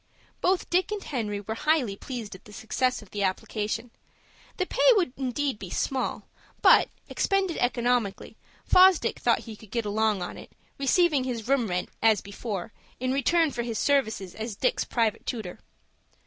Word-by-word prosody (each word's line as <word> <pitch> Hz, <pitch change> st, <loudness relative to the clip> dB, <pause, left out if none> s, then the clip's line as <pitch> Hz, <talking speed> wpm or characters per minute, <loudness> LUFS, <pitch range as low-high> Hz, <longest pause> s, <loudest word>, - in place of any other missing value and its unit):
Both 370 Hz, -1 st, +1 dB
Dick 365 Hz, +4 st, +2 dB
and 420 Hz, -2 st, -3 dB
Henry 215 Hz, -7 st, -3 dB
were 220 Hz, +2 st, -4 dB
highly 255 Hz, -4 st, +1 dB
pleased 235 Hz, -1 st, -6 dB
at 190 Hz, -, -13 dB
the 210 Hz, -, -13 dB
success 250 Hz, +3 st, -1 dB
of 200 Hz, -, -19 dB
the 205 Hz, -, -3 dB
application. 210 Hz, +4 st, -2 dB, 0.7 s
The 370 Hz, -, 0 dB
pay -, -, +3 dB
would 360 Hz, -, +1 dB
indeed 265 Hz, -2 st, -2 dB
be 190 Hz, -, -7 dB
small, 265 Hz, +7 st, -2 dB, 0.4 s
but, -, -, +7 dB, 0.2 s
expended 390 Hz, -4 st, 0 dB
economically, 240 Hz, -3 st, 0 dB, 0.3 s
Fosdick 370 Hz, 0 st, +5 dB
thought -, -, +2 dB
he 225 Hz, -2 st, -9 dB
could 215 Hz, -1 st, -16 dB
get 230 Hz, +1 st, -2 dB
along 210 Hz, -2 st, +1 dB
on 175 Hz, -, -7 dB
it, -, -, -13 dB, 0.3 s
receiving 285 Hz, -1 st, +3 dB
his 235 Hz, -3 st, -4 dB
room 270 Hz, -4 st, +2 dB
rent, 180 Hz, -1 st, -2 dB
as 220 Hz, -3 st, +4 dB
before, 200 Hz, 0 st, -6 dB, 0.3 s
in 255 Hz, +1 st, 0 dB
return 315 Hz, +4 st, +2 dB
for 240 Hz, -, -3 dB
his 235 Hz, -2 st, -3 dB
services 220 Hz, -10 st, +1 dB
as 220 Hz, -1 st, -5 dB
Dick's -, -, 0 dB
private 225 Hz, -2 st, 0 dB
tutor. 215 Hz, -8 st, -4 dB
235 Hz, 165 wpm, -27 LUFS, 210-280 Hz, 0.7 s, but